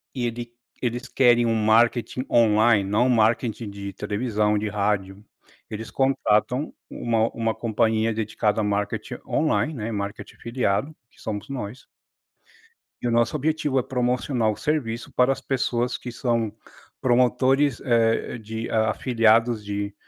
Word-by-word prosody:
e 120 -2 -1
ele 120 0 -6 0.3
eles 120 +1 -3
querem 120 -2 +4
um 115 - +1
marketing 115 +3 +2
online, 110 -2 +4
não 110 +5 +2
um - - +1
marketing 115 -1 +1
de 100 0 -6
televisão, 105 0 0
de 105 - -2
rádio, 100 -1 -2 0.4
eles 110 0 -6
contratam 130 0 +1 0.2
uma 115 -1 0
uma 115 -1 -2
companhia 110 0 +1
dedicada 110 0 0
a - - -1
marketing 105 0 -2
online, 155 0 +1
né, 115 -3 -4
marketing 100 0 -5
afiliado, 120 +4 -1
que - - -26
somos 105 +2 -5
nós 125 -2 -6 1.2
e 120 - -1
o - - 0
nosso 115 +4 +2
objetivo 150 -2 0
é - - -1
promocionar 125 -2 0
o - - -5
serviço 130 -7 -2
para 125 +2 +3
as - - -3
pessoas 125 -2 -1
que 125 - -7
são 115 -3 -1 0.5
promotores, 130 +2 +2
eh, 115 0 +1
de 110 +1 -6
afiliados 115 0 +2
de 100 0 -4
115 Hz, 140 wpm, -24 LUFS, 105-125 Hz, 1.2 s, querem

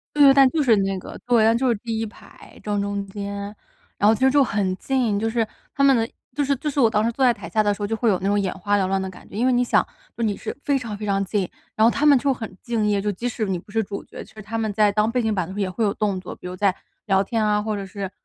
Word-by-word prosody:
对 295 - +4
对， 275 - +9
但 270 -1 +7
就 310 0 +1
是 235 -5 +4
那 195 -1 0
个 - - -9
对， 230 -2 +4
就 260 +1 +1
是 235 - +3
第 225 +1 -4
1 225 - -2
排 210 - -15
正 205 -1 -1
中 200 0 -3
间。 200 0 -6 0.4
然 205 - +2
后 220 - +6
其 220 - -7
实 265 0 +5
就 280 0 +4
很 195 -4 -1
近， 240 -4 0
就 225 - 0
是 225 -1 0 0.3
他 275 - 0
们 270 -2 +6
的 225 0 0 0.3
就 290 - +1
是 280 +1 +1
就 295 +3 -3
是 285 - -6
我 240 -5 +6
当 215 0 +1
时 230 - +2
坐 265 +2 0
在 245 -2 +5
台 - - -9
下 215 -1 +2
的 205 -1 +1
时 205 - -8
候 - - 0
就 225 +1 -2
会 230 0 +1
有 195 - +3
那 195 - -1
种 205 +1 +2
眼 195 -2 -1
花 205 +2 0
缭 190 - +1
乱 195 0 0
的 190 - -4
感 - - -15
觉。 - - -10
因 235 - +1
为 255 - +3
你 245 0 +3
想 - - +3 0.3
说 235 - -5
你 205 -2 0
是 - - -6
非 280 -1 +2
常 225 -5 -6
非 210 - -7
常 195 -1 +1
近， 190 -1 -1 0.3
然 220 - +3
后 230 - +6
他 290 +4 0
们 285 -2 +7
就 275 +1 +1
很 225 -6 -7
敬 230 -3 -1
业， 205 -1 +2
就 210 - 0
即 235 +6 -3
使 225 -2 -2
你 185 -2 -1
不 205 - -15
是 225 0 +1
主 200 0 -6
角， - - -10
其 - - -19
实 215 - -10
他 220 +3 -5
们 220 -2 -1
在 210 0 +3
当 215 +2 +2
背 250 +1 0
景 220 -2 0
板 185 0 -3
也 195 -2 0
会 185 +5 -3
有 200 - +2
动 200 -3 -1
作， 180 - -8
比 - - -11
如 180 - -5
在 195 -1 +2 0.3
聊 195 -1 +3
天 225 +1 -1
啊， 210 0 +2
或 215 0 -2
者 200 - -4
是 195 0 -6
215 Hz, 340 characters per minute, -23 LUFS, 200-235 Hz, 0.4 s, 对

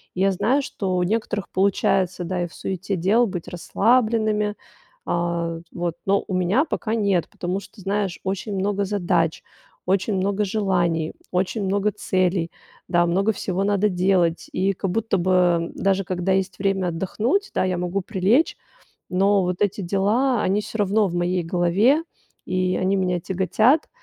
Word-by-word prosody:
Я 195 +1 +2
знаю, 250 +9 +1
что 190 -8 -3
у 180 - +2
некоторых 210 0 -2
получается, 190 -1 +1
да, 180 0 -2
и - - -2
в 175 - -18
суете 190 +1 -3
дел 215 +7 +3
быть 175 -3 -5
расслабленными. 215 +2 +1 0.5
А 170 -1 -1
вот, 175 -1 -3
но 195 +1 +2
у 190 - -4
меня 190 - +2
пока 225 -6 -2
нет, 200 -6 +1
потому 180 +2 -3
что 200 - -15
знаешь, 195 -2 -2
очень 195 +2 -3
много 200 +1 0
задач, 175 -5 0 0.4
очень 195 +2 +1
много 200 +2 0
желаний, 175 -6 0 0.2
очень 190 +4 -1
много 200 +2 +1
целей, 180 -3 0 0.4
да, 175 -1 +3
много 195 +5 +2
всего 190 0 -2
надо 205 +1 +2
делать. 180 -2 +1
И 195 +1 +1
как 190 0 -3
будто 225 -1 0
бы, 185 +2 0
э, 175 -2 +2
даже 195 0 +1
когда 185 +1 -1
есть 190 -1 -1
время 195 -2 0
отдохнуть, 220 - -1
да, - - +1
я 185 -1 -1
могу 180 +2 -1
прилечь, 215 - +1 0.5
но 195 +2 +3
вот 180 +1 -2
эти 205 0 +1
дела, 210 +7 +1
они 200 +3 +1
всё 220 - -7
равно 205 +1 +2
в 175 - -4
моей 175 +1 0
голове, 185 - +2 0.4
и 185 0 0
они 190 +1 +1
меня 180 -2 0
тяготят. 200 - +2
190 Hz, 160 wpm, -23 LUFS, 180-205 Hz, 0.5 s, дел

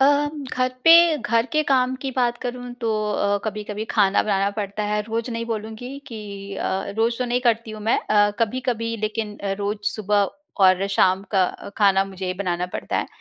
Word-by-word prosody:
अ, 270 - +6 0.5
घर 255 0 +1 0.2
पे 330 - +10 0.2
घर 230 0 +1
के 310 0 +3
काम 255 -1 +3
की 270 - -2
बात 240 -2 +1
करूँ 245 0 -5
तो 230 -2 0 0.2
अ, 200 0 +1
कभी-कभी 210 0 -4
खाना 200 -2 +4
बनाना 200 -1 +1
पड़ता 205 +1 -3
है। 210 - +1
रोज़ 230 +3 -3
नहीं 230 0 -3
बोलूँगी 225 +4 -5
कि 225 -4 -7 0.4
अ, - - -3 0.3
रोज़ 230 +1 +1
तो 250 - 0
नहीं 245 0 0
करती 230 -1 0
हूँ 215 - -8
मैं 225 - +2
अ, 205 -1 +3
कभी-कभी 230 0 -1
लेकिन 215 -1 -3 0.2
रोज़ 205 +1 -2 0.2
सुबह 205 -2 +1 0.3
और 185 0 +5
शाम 190 0 +3
का 190 -2 +4 0.3
खाना 195 -2 +4
मुझे 190 -1 -6
ही 180 - -1
बनाना 180 -2 -2
पड़ता - - -3
है। - - -1
215 Hz, 185 wpm, -23 LUFS, 200-240 Hz, 0.5 s, पे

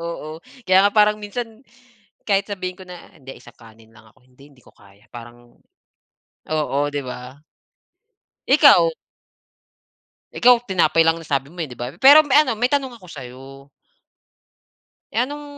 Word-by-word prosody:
Oo, 165 -1 -8 0.2
kaya 190 +2 +4
nga - - -10
parang 210 0 +3
minsan 225 +2 -7 0.6
kahit 200 -1 -1
sabihin 185 -2 -6
ko - - -11
na, 180 -1 -13
"hindi 135 -1 -13
isang - - -17
kanin 115 -1 -19
lang 110 0 -20
ako," 110 +3 -29
hindi 130 +3 -21
hindi 125 - -25
ko - - -21
kaya 100 +2 -23
parang 120 0 -14 0.9
oo, 150 -2 -2
di 145 -1 -4
ba? 125 0 -9 1.1
Ikaw? - - +5 1.4
Ikaw 245 -1 +3
tinapay 170 -6 +1
lang 165 +1 +1
nasabi 140 -3 -4
mo, 175 - -14
eh, 160 - -3
di 125 - -12
ba? 120 +1 -6
Pero 285 +3 +7
may 290 -1 +3
ano, 255 -6 -3
may 245 +4 -1
tanong 270 -3 -2
ako 190 -6 -17
sa'yo. 135 +1 -12 1.5
Eh, 220 - -1
anong 295 +1 -9
165 Hz, 155 wpm, -20 LUFS, 130-210 Hz, 1.5 s, Pero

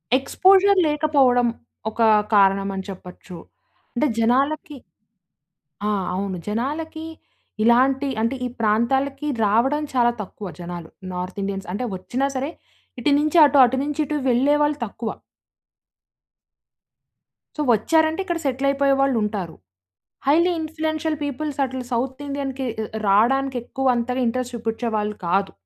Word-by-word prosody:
Exposure 380 +8 +4
లేకపోవడం, 280 -5 +3 0.4
ఒక 230 +2 -5 0.3
కారణం 195 0 +4
అని 190 - -4
చెప్పొచ్చు. 180 -1 -10 0.6
అంటే, 295 +5 +2
జనాలకి 280 +6 +1 1.1
ఆ! - - +1 0.2
అవును. 190 -1 -3
జనాలకి 305 +8 -3 0.6
ఇలాంటి 265 +4 +3
అంటే, 230 +4 0
ఈ - - 0
ప్రాంతాలకి 270 +7 +1 0.2
రావడం 265 +9 +2
చాలా 240 -1 +3
తక్కువ 200 0 -8
జనాలు. 175 -1 -7 0.2
నార్త్ 180 +2 -5
ఇండియన్స్ 195 0 -4
అంటే, 250 +5 -2
వచ్చినా 255 +9 -2
సరే 270 +4 -2 0.5
ఇటు 290 - +2
నుంచి 305 +3 +1
అటు, 285 0 +3
అటు 260 +2 -1
నుంచి 295 +1 -2
ఇటు 300 +1 -3
వెళ్ళేవాళ్ళు 290 +4 +2
తక్కువ. 220 +2 -6 2.5
సో, 305 - -2
ఒచ్చారంటే, 315 - +1
ఇక్కడ 345 -3 -2
సెటిలయిపోయే 275 +1 +1
వాళ్ళుంటారు. 210 -9 -1 0.7
హైలీ 340 +5 +4
ఇన్‌ఫ్లుయెన్షియల్ 315 0 -2
పీపుల్స్ 285 0 -4
అట్లా 260 0 -5
సౌత్ 260 +4 -2
ఇండియన్‌కి 275 -1 -4
ఆహ్, 220 -1 -4
ఆహ్, - - -20 0.2
రాడానికెక్కువంతగా 250 +2 +1
ఇంట్రస్ట్ 250 +1 -2
చూపిచ్చేవాళ్ళు 225 -2 -2
కాదు. 195 +2 +1
260 Hz, 115 wpm, -22 LUFS, 220-295 Hz, 2.5 s, Exposure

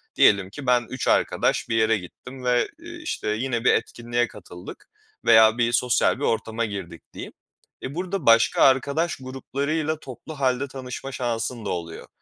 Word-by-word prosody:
diyelim 100 -2 +4
ki 135 +5 -9
ben 125 -1 +3
3 130 - -4
arkadaş - - +1
bir 115 - 0
yere 110 0 +3
gittim 125 +8 -11
ve, 125 -1 +2
eee, 340 +1 -10
işte 310 - -4
yine 120 +2 -1
bir - - +6
etkinliğe 120 0 -1
katıldık 90 -3 -12 0.4
veya 110 0 +6
bir 120 -1 +2
sosyal 125 +1 +2
bir - - -5
ortama 115 0 -1
girdik 95 -5 -7
diyeyim. - - -8 0.5
E, 135 +3 -5
burada 185 -2 -3
başka 115 0 +5
arkadaş 140 +6 +2
gruplarıyla 140 +4 -3
toplu 140 +3 -10
halde 130 0 +1
tanışma 135 0 -7
şansın 120 -2 -3
da - - -2
oluyor. 85 -2 -5
125 Hz, 160 wpm, -24 LUFS, 115-135 Hz, 0.5 s, bir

